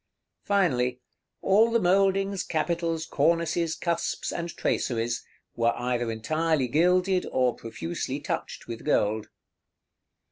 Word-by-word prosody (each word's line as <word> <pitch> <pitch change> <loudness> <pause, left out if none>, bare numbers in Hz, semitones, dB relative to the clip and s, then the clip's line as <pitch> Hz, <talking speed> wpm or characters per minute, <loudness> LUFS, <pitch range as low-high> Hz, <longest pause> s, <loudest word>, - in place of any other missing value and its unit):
Finally, 130 -11 +1 0.4
all 215 +4 +5
the 230 0 +2
mouldings, 195 0 +2
capitals, 165 0 -1
cornices, 165 +2 +1
cusps, 170 -1 -2
and 170 0 -3
traceries, 120 0 -1 0.3
were 115 0 +2
either 120 -1 -1
entirely 155 +5 0
gilded 180 +6 +2
or 125 -2 +2
profusely 85 -7 -5
touched - - -4
with 115 -1 -7
gold. 105 +1 +1
160 Hz, 105 wpm, -27 LUFS, 120-180 Hz, 0.4 s, all